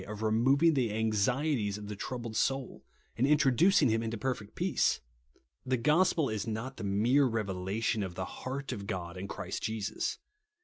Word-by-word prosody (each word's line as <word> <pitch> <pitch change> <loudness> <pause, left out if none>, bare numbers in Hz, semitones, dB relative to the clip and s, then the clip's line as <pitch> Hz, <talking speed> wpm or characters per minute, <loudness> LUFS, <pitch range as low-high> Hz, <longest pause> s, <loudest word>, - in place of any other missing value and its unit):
of 105 +1 -6
removing 135 +9 +4
the 125 -6 +1
anxieties 110 +1 0
of 105 -1 -8
the 105 - -5
troiihled 120 +1 -5
soul, 135 +3 -1 0.3
and 130 - +2
introducing 150 +5 +4
him 115 +1 +1
into 115 0 -3
perfect 110 -3 -4
peace. - - +1 0.6
The 130 0 0
gospel 155 +4 +3
is 110 -3 -3
not 115 +5 -4
the - - -6
mere 115 +8 +3
revelation 105 -1 -1
of 95 -3 -4
the 95 - -3
heart 135 +6 -5
of 100 -1 -5
God 85 -2 -4
in 95 +2 -5
Christ - - -5
Jesus. 110 -2 -2
115 Hz, 165 wpm, -31 LUFS, 105-135 Hz, 0.6 s, removing